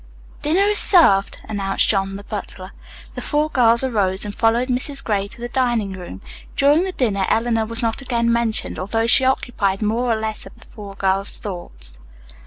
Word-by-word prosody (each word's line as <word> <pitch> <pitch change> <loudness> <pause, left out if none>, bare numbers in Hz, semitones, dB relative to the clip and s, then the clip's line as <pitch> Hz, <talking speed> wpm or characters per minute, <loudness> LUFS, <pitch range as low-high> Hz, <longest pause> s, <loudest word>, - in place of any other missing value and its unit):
"Dinner 320 +6 +2
is 415 0 +2
served," 200 - +4
announced 195 -2 0
John, 195 -1 0
the 200 - -8
butler. 195 -3 -7 0.4
The - - -6
four 300 +1 0
girls 235 -2 +4
arose 205 -6 0
and 205 - -5
followed 230 +3 +1
Mrs. 275 +2 -3
Gray 200 -2 -1
to 235 +4 -15
the 240 - -4
dining 240 -6 0
room. 180 - -9 0.3
During 290 +6 +3
the 380 - -3
dinner 205 - 0
Eleanor 225 -1 +1
was 230 +1 -3
not 230 +3 -1
again 235 -3 0
mentioned, 235 -2 -1
although 225 +4 -1
she 255 +3 +4
occupied 215 -6 0
more 230 +3 0
or 220 - 0
less 220 -1 -4
of - - -16
the - - -17
four 205 -3 -11
girls' 195 0 0
thoughts. 65 - -8
225 Hz, 185 wpm, -20 LUFS, 195-250 Hz, 0.4 s, served